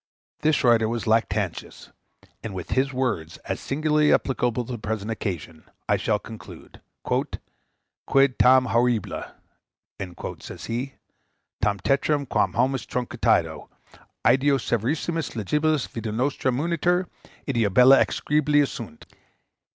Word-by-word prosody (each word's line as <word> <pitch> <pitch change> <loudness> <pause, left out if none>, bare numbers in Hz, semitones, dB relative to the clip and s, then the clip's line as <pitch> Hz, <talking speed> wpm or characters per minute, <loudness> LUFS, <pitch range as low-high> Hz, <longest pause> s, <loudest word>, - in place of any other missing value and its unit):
This 155 -1 +2
writer 115 -3 +4
was 115 0 -3
Lactantius; 110 -4 -1 0.5
and 105 -4 -6
with 90 - -7
his 135 +1 +1
words, 115 -12 -2
as - - -3
singularly 150 +1 +1
applicable 125 -2 +1
to 125 - -8
the 120 - -4
present 110 0 -3
occasion, 85 -7 -5 0.2
I - - +3
shall - - 0
conclude: - - -12 0.2
"Quid 135 -2 -2
tam 130 0 +6
horribile," 120 -1 0 1.1
says - - -9
he, 125 +4 -4 0.7
"tam 100 0 +1
tetrum, 140 +1 +1
quam - - +1
hominis 130 -2 0
trucidatio? 125 -1 0 0.6
Ideo 135 +3 +4
severissimis 150 +8 -2
legibus 150 +7 0
vita 115 -2 -5
nostra 130 +3 0
munitur; 170 +6 0 0.4
ideo 115 -7 +1
bella 125 +6 +7
execrabilia 145 -1 +1
sunt. - - -9
125 Hz, 115 wpm, -24 LUFS, 115-140 Hz, 1.1 s, bella